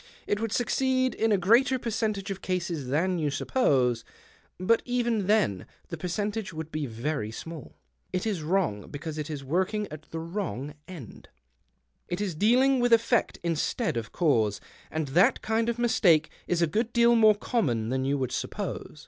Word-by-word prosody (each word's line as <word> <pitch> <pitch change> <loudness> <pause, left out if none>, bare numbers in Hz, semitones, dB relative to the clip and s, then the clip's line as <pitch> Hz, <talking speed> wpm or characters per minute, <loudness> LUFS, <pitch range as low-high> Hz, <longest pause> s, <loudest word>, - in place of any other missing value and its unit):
It 205 - 0
would 225 -1 -2
succeed 260 +2 +1
in 225 0 +1
a 205 - +4
greater 235 +8 +4
percentage 215 -4 -2
of 195 - -5
cases 175 -6 -2
than 170 +7 +1
you 150 -2 0
suppose; 130 - +1 0.6
but 225 +5 +3
even 235 -5 0
then 205 - +2 0.2
the - - -4
percentage 205 +3 -3
would 160 0 -7
be 155 -2 -2
very 115 0 -3
small. 160 +6 -9 0.3
It 185 - -2
is 205 -7 -1
wrons:, 155 - -1
because 155 +1 -5
it 150 +1 -4
is 145 -3 -5
workins^ 190 +9 0
at 155 0 -10
the 165 - -6
wronsj 165 - -4
end. 160 - -11 0.8
It 175 - -3
is 195 -5 -2
dealing^ 255 - +4
with 245 -1 +3
effect 230 +1 +2
instead 170 - -1
of 115 -1 -4
cause, 115 - +1 0.3
and 155 -3 -3
that 175 +8 +3
kind 225 +1 +1
of 235 - -1
mistake 175 -10 +3 0.2
is 175 -1 +1
a 155 - -1
good 225 +2 0
deal 235 0 +5
more 215 -2 +6
common 125 - -1
than 130 +1 0
you 140 +2 0
would 130 -3 -2
suppose. - - -4
180 Hz, 175 wpm, -27 LUFS, 150-225 Hz, 0.8 s, more